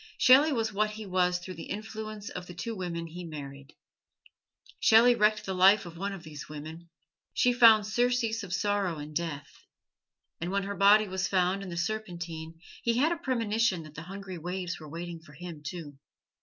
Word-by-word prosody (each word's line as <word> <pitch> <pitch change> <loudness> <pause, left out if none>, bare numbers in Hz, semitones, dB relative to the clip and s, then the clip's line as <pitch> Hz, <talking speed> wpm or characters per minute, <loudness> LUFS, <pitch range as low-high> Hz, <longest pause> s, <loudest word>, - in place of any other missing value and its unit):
Shelley 275 +5 +6
was 225 -5 -1
what 215 +2 +1
he 215 0 -8
was 180 -1 +1
through 185 +1 -8
the 165 - -9
influence 215 0 -6
of 180 -1 -7
the 175 - -10
two 225 +6 -4
women 170 -3 -4
he 175 +2 -8
married. 140 -3 -9 1.0
Shelley 230 +2 +6
wrecked 215 -1 +2
the 190 - -2
life 190 +2 +5
of 170 -1 -9
one 200 +4 -3
of 195 -4 -8
these 150 -2 -9
women. 155 +3 -9 0.5
She 245 - +3
found 225 -3 +7
surcease 235 0 +1
of 195 -4 -8
sorrow 200 -3 0
in 150 +1 -8
death; 145 -4 -5 0.8
and 175 - -3
when 200 +1 0
her 200 +1 -3
body 205 +2 +6
was 190 +1 -1
found 185 +1 +1
in 195 - -7
the 170 - -6
Serpentine 170 -4 -4 0.2
he 235 0 +1
had 300 +6 +3
a - - +1
premonition 230 - 0
that 155 -1 -12
the 155 - -8
hungry 190 0 -8
waves 180 +2 -4
were 155 -1 -10
waiting 170 +2 -6
for 160 -2 -17
him, 170 -1 -9
too. 150 -2 -7
185 Hz, 190 wpm, -29 LUFS, 165-215 Hz, 1.0 s, found